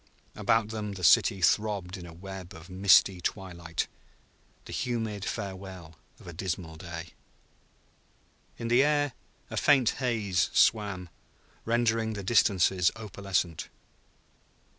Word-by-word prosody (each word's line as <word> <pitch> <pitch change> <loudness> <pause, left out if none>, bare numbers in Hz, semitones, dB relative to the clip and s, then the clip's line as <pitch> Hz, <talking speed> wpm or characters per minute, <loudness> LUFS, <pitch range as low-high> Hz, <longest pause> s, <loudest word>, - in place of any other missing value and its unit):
About 115 -1 +1
them 105 -2 -4
the 95 -2 -8
city 95 +3 +5
throbbed 100 -1 +1
in 90 -3 -9
a - - -10
web 95 +1 -9
of 80 +3 -12
misty 95 -1 +5
twilight, 85 -4 -3 0.8
the - - -9
humid 110 -5 -2
farewell 95 -6 -6 0.2
of - - -16
a 85 - -8
dismal 85 -1 -4
day. 85 0 -8 1.5
In 115 - -4
the 120 +2 +5
air 145 -2 +1 0.4
a - - -4
faint 135 -6 +4
haze 105 -8 +1
swam, 100 -5 +2 0.6
rendering 115 -1 +1
the 100 -2 -5
distances 95 -3 +3
opalescent. 95 -6 -3
95 Hz, 120 wpm, -28 LUFS, 90-110 Hz, 1.5 s, city